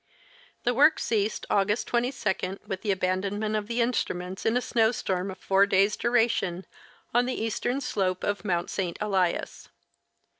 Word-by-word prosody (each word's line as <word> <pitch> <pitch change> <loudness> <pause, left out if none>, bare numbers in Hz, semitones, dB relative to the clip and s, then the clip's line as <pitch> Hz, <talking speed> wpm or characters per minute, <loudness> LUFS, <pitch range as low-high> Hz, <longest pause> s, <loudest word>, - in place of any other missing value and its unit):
The 245 - +2
work 295 +6 +5
ceased 215 -1 -1
August 205 +2 +2
22 230 -6 -1
with 190 -1 -4
the 215 - -4
abandonment 200 +3 0
of 210 -1 -2
the 235 +1 0
instruments 190 -6 -2
in 225 +2 +3
a - - +3
snow 225 -2 +2
storm 190 -5 -2
of 190 - -7
four 195 +1 +3
days' 200 +1 +3
duration 225 -7 +1 0.5
on 245 +1 +3
the 255 - -2
eastern 240 +4 -1
slope 190 -8 -1
of 205 0 -1
Mount 175 -4 -1
St. 180 -4 -2
Elias. 190 -4 -1
205 Hz, 155 wpm, -27 LUFS, 190-235 Hz, 0.5 s, work